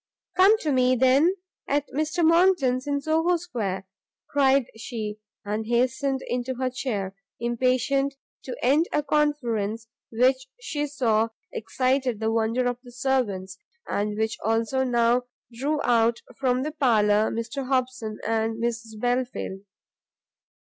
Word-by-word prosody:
"Come 395 +4 +6
to 305 - 0
me, 255 -1 +3
then, 265 +8 +4 0.3
at 285 0 +1
Mr 310 +4 0
Monckton's 320 -7 +3
in 285 0 0
Soho 325 +3 +2
Square," 205 - -4 0.4
cried 275 -2 +3
she, 220 -2 -5 0.3
and 215 +2 -3
hastened 260 +3 +1
into 250 +1 -2
her 255 0 -1
chair, 205 -7 -3 0.2
impatient 255 +3 +1 0.3
to 255 - -5
end 290 +7 +3
a 295 - +1
conference 240 -8 0 0.3
which 260 +3 +2
she 295 -11 -3
saw 230 -6 +1 0.2
excited 255 0 0
the 220 0 0
wonder 230 +2 +1
of 245 0 -1
the 245 -1 -14
servants, 220 -8 -1 0.3
and 210 +1 -1
which 220 0 -1
also 225 +4 +1
now 240 0 +2 0.3
drew 285 +6 -1
out 235 -1 +2
from 255 -1 +1
the 305 - -3
parlour 220 -7 +3
Mr 240 +4 -4
Hobson 255 -4 -1
and 225 0 0
Mrs 230 -2 -3
Belfield. 245 -5 -1
250 Hz, 130 wpm, -25 LUFS, 225-275 Hz, 0.4 s, Come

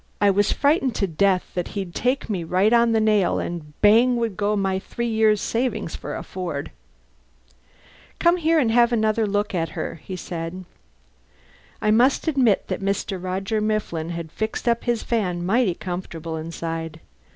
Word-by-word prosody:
(I 205 -1 +5
was 205 +1 +2
frightened 280 -4 +2
to 200 - +1
death 185 +2 +1
that 180 -1 -2
he'd 190 -3 -4
take 255 +2 0
me 190 -6 -2
right 185 +7 +2
on 235 0 +4
the 225 - +3
nail 215 -3 +2
and 155 -4 -6
bang 230 +4 +5
would 230 -4 -1
go 210 +1 0
my 195 -2 0
three 235 +4 -4
years' 220 -2 +3
savings 225 -7 -2
for - - -6
a - - -5
Ford.) 170 -6 -5 1.5
"Come 345 +1 +3
and 315 -8 +2
have 235 +1 +4
another 220 -1 +1
look 205 +1 -1
at 165 -2 -1
her," 165 - -4
he 185 - -6
said. 175 +1 -6 1.2
I 215 - +3
must 250 +8 +3
admit 260 -10 +2
that - - -3
Mr. 195 -1 -2
Roger 195 +4 -2
Mifflin 210 -7 -1
had 170 -2 -5
fixed 220 +5 -4
up 235 0 +1
his 240 -2 0
van 180 -7 -1
mighty 210 -2 +2
comfortably 165 -3 -5
inside. 165 -1 -5
205 Hz, 165 wpm, -23 LUFS, 175-230 Hz, 1.5 s, I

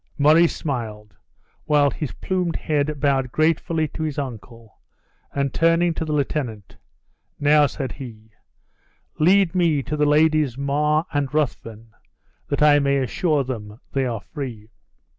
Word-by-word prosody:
Murray 155 +4 +5
smiled, 110 - -5 0.5
while 145 -2 +3
his 150 - -4
plumed 180 -3 -2
head 150 -1 -1
bowed 135 -3 +1
gratefully 160 +1 +1
to - - -7
his 155 -2 -3
uncle, 115 -4 -8 0.5
and 140 -1 -2
turning 165 +1 +3
to 160 - -3
the 155 - -4
lieutenant, 135 - -3 0.6
"Now," 145 0 +5
said 135 -2 -5
he, 110 -5 -10 0.9
"lead 180 +2 +4
me 165 -6 +2
to 150 - -3
the 150 0 +2
Ladies 150 -3 +3
Mar 150 +3 +1
and 145 -2 -1
Ruthven 115 -7 -3 0.6
that 145 - 0
I 145 -1 +6
may 140 0 +1
assure 145 - 0
them 110 -4 -7
they 135 -1 0
are 115 -3 -4
free." 120 -7 -8
145 Hz, 140 wpm, -22 LUFS, 125-155 Hz, 0.9 s, I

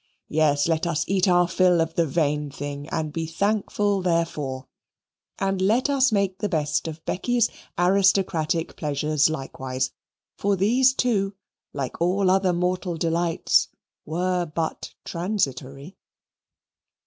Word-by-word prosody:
Yes, 150 -1 +2
let 165 +1 0
us 165 -1 0
eat 195 0 +2
our 175 -1 +4
fill 180 0 +3
of 165 0 0
the 170 -1 +1
vain 150 0 0
thing 145 +1 -6
and 155 -2 -3
be 165 0 -3
thankful 205 +2 0
therefor. 160 -7 -1 0.7
And 195 -1 -1
let 230 +9 +2
us 270 -2 +3
make 200 -2 0
the 210 - -1
best 150 -2 0
of 160 0 -8
Becky's 240 +4 +1 0.3
aristocratic 180 -3 +2
pleasures 150 0 +1
likewise 130 -3 -3 0.5
for 200 0 +2
these 250 +7 +3
too, 200 -6 0 0.4
like 135 +2 -5
all 185 +2 +2
other 190 -1 +3
mortal 180 0 -1
delights, 165 +1 +1 0.4
were 180 +2 -1
but 160 +1 -4
transitory. 150 -4 -3
170 Hz, 125 wpm, -24 LUFS, 155-195 Hz, 0.7 s, our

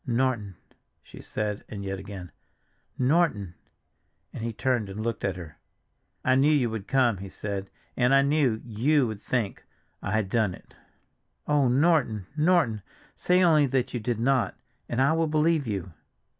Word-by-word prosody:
"Norton!" 120 -5 0 0.5
she - - -12
said 105 -1 -3
and 100 -2 -6
yet 95 0 -4
again, 95 -4 -8 0.7
"Norton!" 130 - +1 0.8
and - - -6
he 115 - -2
turned 120 -2 -1
and 95 +2 -7
looked 115 -1 -3
at 95 -2 0
her. 85 -5 -10 0.7
"I 130 - +4
knew 135 +4 +4
you 130 -6 +2
would 110 -3 -5
come," 125 -6 +2
he 95 +1 -8
said, 100 0 -5 0.3
"and 125 0 +2
I 135 0 +6
knew—you 135 -1 +2
would 110 -3 -5
think—I 105 -3 -4
had 110 -2 +1
done 105 -3 +1
it." - - -20 0.7
"Oh, 145 -3 +3
Norton, 125 - +2
Norton! 155 - +2 0.3
Say 180 +1 +3
only 155 -4 +5
that 130 -1 -1
you 120 - -1
did 115 0 -2
not, 130 +1 +1 0.3
and 120 - -2
I 135 +4 +4
will 165 0 +1
believe 155 -2 +2
you." 95 -5 -4
120 Hz, 155 wpm, -27 LUFS, 105-140 Hz, 0.8 s, I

